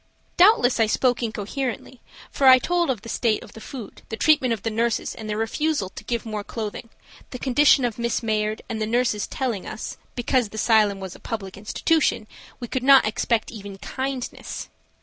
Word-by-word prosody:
Doubtless, 350 - +5
I 225 - +4
spoke 245 +3 +1
incoherently, 235 +3 -4 0.3
for 275 - +2
I 260 0 +10
told 345 +4 0
of 235 -6 -2
the - - -9
state 230 -1 0
of - - -14
the 220 - -11
food, 235 -6 -9
the 225 - -4
treatment 280 -4 +3
of 225 -3 -2
the 225 - -1
nurses 230 +1 0
and 215 -1 -8
their 210 - -2
refusal 255 0 -1
to 195 - -10
give 235 +2 -3
more 215 -2 -4
clothing, 220 +1 -6 0.4
the 250 - -6
condition 270 +1 +4
of 235 -1 -3
Miss 235 0 -1
Mayard, 215 -1 -1
and 220 -1 -4
the 215 - 0
nurses 235 -2 0
telling 240 -8 -3
us, - - -6 0.2
because 245 -2 +1
the 220 - -12
asylum 215 -3 +3
was 190 -2 -6
a - - -13
public 200 -5 -6
institution 220 +5 0 0.3
we 240 - -5
could 260 - -2
not 270 +1 +7
expect 220 +1 0
even 200 -3 -9
kindness. 265 +4 -5
230 Hz, 190 wpm, -24 LUFS, 215-260 Hz, 0.4 s, I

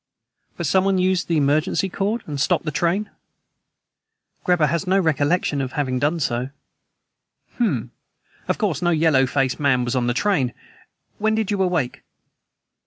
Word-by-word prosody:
"But - - -3
someone 190 0 +2
used 185 0 +1
the 165 - +1
emergency 150 +6 +1
cord, 205 +5 -2
and 145 -3 -4
stopped 180 +1 +1
the 155 - -1
train." 175 +7 0 1.3
"Greba 180 -4 +3
has 170 +5 -1
no 190 +1 +3
recollection 150 -2 +1
of 130 -1 -4
having 130 -3 -1
done 150 +5 0
so." 125 -2 -1 1.1
"Hm! 125 - 0 0.6
Of - - 0
course, - - -1
no 175 - +2
yellow 155 -5 +3
faced 135 0 0
man 130 -4 +2
was 120 - -2
on 125 -1 0
the 120 - 0
train. 145 -10 +1 0.6
When 220 +1 +1
did 220 -2 -1
you 200 -2 0
awake?" 175 -9 -1
160 Hz, 155 wpm, -22 LUFS, 135-185 Hz, 1.3 s, Greba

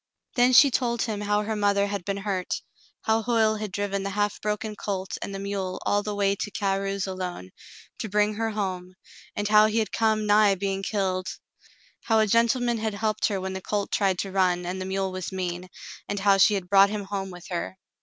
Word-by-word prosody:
Then 245 +1 +4
she 275 +3 +8
told 235 -1 0
him 215 -3 -3
how 205 0 +1
her 220 +1 -2
mother 200 -1 +2
had 200 -2 -3
been 200 +2 -2
hurt. 195 -2 -3 0.4
How 220 0 +2
Hoyle 220 -1 +2
had 210 -2 -5
driven 200 0 -2
the 200 - -3
half 205 0 -1
broken 210 0 -2
colt 195 -2 -4
and - - -4
the 195 - -5
mule 195 -2 -3
all 205 - +2
the 210 0 -4
way 200 -1 +2
to 210 - -3
Carew's 195 -1 -1
alone, 185 - -5 0.5
to 220 - -4
bring 210 +1 +2
her 225 +1 -1
home, 185 -4 -4 0.4
and 205 0 -1
how 215 0 +6
he 215 +1 -1
had 220 -1 0
come 220 -1 +1
nigh 205 -1 +5
being 195 0 -2
killed. 190 -2 -1 0.8
How 225 - +3
a 220 - +4
gentleman 235 +2 +2
had 220 -1 -2
helped 215 0 0
her 200 -3 -2
when 190 0 -4
the 190 - -5
colt 205 +1 -2
tried 195 -3 +1
to 195 - -5
run 180 -2 +1
and 185 +2 -4
the - - -3
mule 190 0 -1
was 185 0 -5
mean, 180 -1 -4 0.4
and 205 - -2
how 200 -1 +5
she 205 +2 +6
had 190 -3 -3
brought 195 +1 +6
him 210 0 -3
home 195 -1 -4
with 180 -2 -11
her. 175 +2 -3
200 Hz, 215 wpm, -26 LUFS, 190-215 Hz, 0.8 s, she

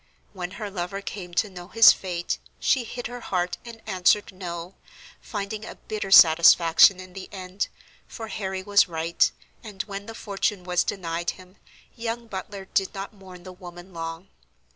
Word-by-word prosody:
When 180 -1 -5
her 210 -3 -5
lover 185 +1 -4
came 185 -3 -7
to 210 - +2
know 175 -1 -9
his 225 +4 +8
fate, 175 -2 -3 0.2
she 255 -3 +2
hid 245 +2 -6
her 245 +1 -5
heart, 180 -5 -2
and 230 -1 -11
answered 195 +1 +2
"no," 175 -1 -6 0.5
finding 210 0 -5
a - - -8
bitter 215 -2 -5
satisfaction 170 +1 +7
in 185 -1 -11
the 190 0 -8
end, 190 0 -4 0.4
for 225 -2 -7
Harry 190 -3 -4
was 205 +1 +4
right, 165 0 +1 0.3
and, 200 -4 -5
when 200 0 -7
the 225 - -8
fortune 200 -2 -2
was 180 -1 +1
denied 170 -3 -3
him, 185 +1 -16 0.4
young 235 0 -4
Butler 195 -1 -7
did 195 +1 -1
not 195 +2 -6
mourn 185 -3 -13
the 185 0 -9
woman 175 0 -12
long. 165 +2 -6
190 Hz, 165 wpm, -25 LUFS, 180-205 Hz, 0.5 s, his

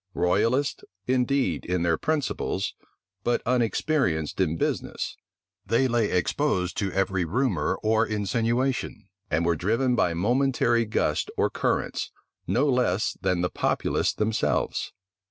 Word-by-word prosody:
Royalists 115 +10 +1 0.2
indeed 125 - +1
in 90 -1 -1
their 85 -1 +3
principles, 155 - -1 0.5
but 120 - +1
unexperienced 115 - 0
in 80 -3 +1
business, - - -2 0.5
they 115 +5 +2
lay 120 -4 +1
exposed 90 - 0
to 100 -2 -1
every 95 -1 0
rumor 125 +10 0
or 110 +1 +3
insinuation; 115 +5 -1 0.2
and 80 +2 +1
were 85 0 +2
driven 115 - +1
by 90 -7 +1
momentary 120 +3 +2
gusts 110 - 0
or - - +2
currents, - - -1 0.4
no 135 +5 +2
less 125 -6 +1
than 90 -2 +1
the 90 - 0
populace - - 0
themselves. 110 +1 -1
110 Hz, 120 wpm, -26 LUFS, 90-125 Hz, 0.5 s, their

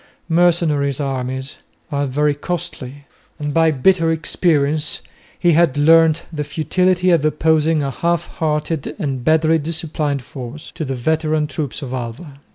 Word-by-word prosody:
Mercenary 165 -4 +2
armies 130 -1 -3 0.3
are 140 -1 0
very 145 +3 +1
costly, 145 -3 -6 0.3
and 145 -2 -3
by 165 +1 +4
bitter 165 +4 +3
experience 155 -2 0 0.4
he 175 - +3
had 165 -4 +3
learnt 160 +1 +5
the 150 -1 -2
futility 180 +5 +1
of 165 -4 +3
opposing 155 0 +2
a 135 - -2
half 170 +4 0
hearted 150 -1 -1
and 135 - -3
badly 160 +2 +3
disciplined 150 -3 -3
force 130 +3 -9
to - - -5
the 135 -2 -3
veteran 155 +3 0
troops 150 -1 -4
of 130 -1 -6
Alva. 130 +4 -6
150 Hz, 140 wpm, -19 LUFS, 140-165 Hz, 0.4 s, learnt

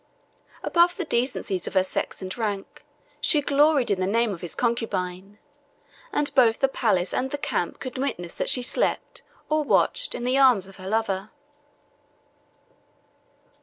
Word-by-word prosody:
Above 345 +1 +3
the 370 - -3
decencies 235 - -1
of - - -6
her 190 - +5
sex 190 - -3
and 185 0 -5
rank, 210 +2 -4 0.4
she 295 +1 +3
gloried 285 -3 +3
in 195 - +1
the 185 - 0
name 225 +1 +1
of 170 - -9
his 175 - -4
concubine; 200 -5 -2 0.7
and 295 - 0
both 235 -4 +4
the 270 - +3
palace 200 -9 0
and 265 - -1
the 290 - -3
camp - - -2
could 255 -1 -6
witness 175 -11 -3
that - - -2
she 250 - +3
slept, - - -1 0.3
or 310 0 +1
watched, - - +2
in - - -5
the 255 +2 +2
arms 245 -8 +5
of 195 - -14
her 190 -1 -9
lover. 210 -2 -1
230 Hz, 160 wpm, -25 LUFS, 195-275 Hz, 0.7 s, her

